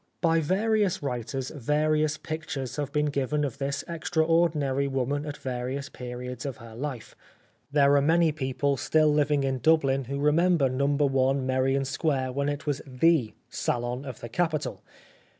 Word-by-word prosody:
By 165 Hz, -1 st, +3 dB
various 200 Hz, +2 st, +1 dB
writers 130 Hz, 0 st, -3 dB
various 155 Hz, +2 st, +1 dB
pictures 155 Hz, -5 st, -5 dB
have 145 Hz, -2 st, -2 dB
been 150 Hz, +1 st, +1 dB
given 140 Hz, +2 st, 0 dB
of 135 Hz, -, -5 dB
this 140 Hz, 0 st, -2 dB
extraordinary 160 Hz, -4 st, +1 dB
woman 140 Hz, +2 st, -1 dB
at 150 Hz, -, -5 dB
various 130 Hz, +2 st, -4 dB
periods 125 Hz, 0 st, -7 dB
in 140 Hz, -2 st, -3 dB
her 115 Hz, 0 st, -13 dB
life. 130 Hz, -1 st, -6 dB, 0.6 s
There 140 Hz, -1 st, +5 dB
are 140 Hz, -, +5 dB
many 165 Hz, +2 st, +3 dB
people 140 Hz, -1 st, -1 dB
still 155 Hz, +3 st, +3 dB
living 145 Hz, -1 st, +2 dB
in 135 Hz, -1 st, -1 dB
Dublin 135 Hz, -3 st, +3 dB
who 140 Hz, +3 st, -4 dB
remember 150 Hz, 0 st, +3 dB
No. 135 Hz, +2 st, 0 dB, 0.4 s
i -, -, +3 dB
Merrion 135 Hz, 0 st, +1 dB
Square 135 Hz, -2 st, -1 dB
when 140 Hz, +2 st, -1 dB
it 145 Hz, 0 st, -4 dB
was 145 Hz, -2 st, -1 dB
the 135 Hz, -2 st, +2 dB
salon 120 Hz, +2 st, -2 dB
of 130 Hz, -4 st, -8 dB
the 120 Hz, -, -7 dB
capital. 155 Hz, +3 st, -1 dB
140 Hz, 155 wpm, -27 LUFS, 130-155 Hz, 0.6 s, There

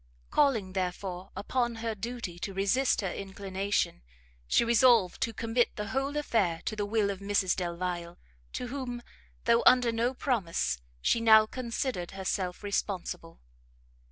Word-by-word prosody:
Calling, 230 Hz, -11 st, +2 dB
therefore, 185 Hz, 0 st, -3 dB
upon 240 Hz, +2 st, -1 dB
her 225 Hz, 0 st, -3 dB
duty 215 Hz, -4 st, -6 dB
to 195 Hz, +1 st, -5 dB
resist 220 Hz, +8 st, +2 dB
her 190 Hz, -3 st, -2 dB
inclination, 195 Hz, -, -2 dB, 0.5 s
she 235 Hz, -, +3 dB
resolved 235 Hz, -5 st, +4 dB
to 230 Hz, -, +1 dB
commit 230 Hz, +1 st, 0 dB
the 210 Hz, -1 st, -4 dB
whole 270 Hz, +4 st, -1 dB
affair 200 Hz, -, 0 dB
to 215 Hz, -, -2 dB
the 205 Hz, -1 st, -2 dB
will 210 Hz, -1 st, +1 dB
of 195 Hz, -, -6 dB
Mrs 200 Hz, -2 st, +1 dB
Delvile, 175 Hz, -1 st, -3 dB, 0.4 s
to 250 Hz, -, -4 dB
whom, 245 Hz, -2 st, -5 dB, 0.4 s
though 235 Hz, 0 st, +4 dB
under 250 Hz, -2 st, +6 dB
no 235 Hz, +3 st, 0 dB
promise, 180 Hz, -, -1 dB, 0.2 s
she 230 Hz, -, +3 dB
now 220 Hz, -1 st, +7 dB
considered 235 Hz, -5 st, -3 dB
herself 185 Hz, -1 st, -2 dB
responsible. 190 Hz, -4 st, -3 dB
210 Hz, 140 wpm, -29 LUFS, 185-235 Hz, 0.5 s, now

